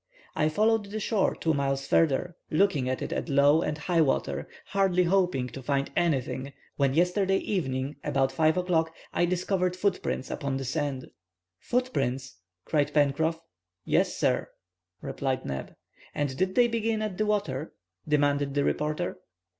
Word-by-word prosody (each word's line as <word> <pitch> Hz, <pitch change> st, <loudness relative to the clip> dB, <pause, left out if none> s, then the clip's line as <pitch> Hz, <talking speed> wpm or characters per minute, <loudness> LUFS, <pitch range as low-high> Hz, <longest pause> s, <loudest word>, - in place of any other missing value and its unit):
"I 155 Hz, 0 st, +2 dB
followed 215 Hz, +5 st, +2 dB
the 210 Hz, +2 st, -5 dB
shore 210 Hz, -1 st, +1 dB
two 160 Hz, -, 0 dB
miles 135 Hz, -1 st, -1 dB
further, 165 Hz, +3 st, +2 dB
looking 155 Hz, -7 st, +2 dB
at 130 Hz, -, -2 dB
it -, -, -3 dB
at -, -, -3 dB
low 140 Hz, +3 st, +5 dB
and 150 Hz, -2 st, -2 dB
high 165 Hz, +2 st, +1 dB
water, 70 Hz, -, 0 dB, 0.2 s
hardly 190 Hz, -2 st, +2 dB
hoping 175 Hz, -8 st, +2 dB
to 135 Hz, -, -8 dB
find 140 Hz, +1 st, -1 dB
anything, 140 Hz, -4 st, 0 dB, 0.2 s
when 140 Hz, -1 st, +1 dB
yesterday 190 Hz, +3 st, +2 dB
evening, 135 Hz, -9 st, -2 dB
about 135 Hz, -3 st, +1 dB
5 160 Hz, +1 st, +2 dB
o'clock, 165 Hz, -3 st, +1 dB, 0.2 s
I 175 Hz, -, +3 dB
discovered 180 Hz, +1 st, 0 dB
footprints 185 Hz, -8 st, -1 dB
upon 140 Hz, -1 st, -2 dB
the 135 Hz, -, -4 dB
sand." 140 Hz, -1 st, -3 dB, 0.5 s
"Footprints," 135 Hz, -, -1 dB, 0.3 s
cried 145 Hz, -1 st, 0 dB
Pencroff. 160 Hz, +3 st, +2 dB, 0.4 s
"Yes, -, -, +1 dB
sir," -, -, +1 dB, 0.5 s
replied 135 Hz, -2 st, -2 dB
Neb. 70 Hz, 0 st, -5 dB, 0.4 s
"And 145 Hz, -3 st, -1 dB
did 185 Hz, +5 st, 0 dB
they 245 Hz, -1 st, +5 dB
begin 225 Hz, -1 st, -1 dB
at 210 Hz, -3 st, -4 dB
the 215 Hz, -, +1 dB
water?" 205 Hz, -8 st, -1 dB, 0.3 s
demanded 145 Hz, -1 st, +2 dB
the 145 Hz, -, +2 dB
reporter. 150 Hz, +5 st, -1 dB
155 Hz, 150 wpm, -28 LUFS, 135-185 Hz, 0.5 s, low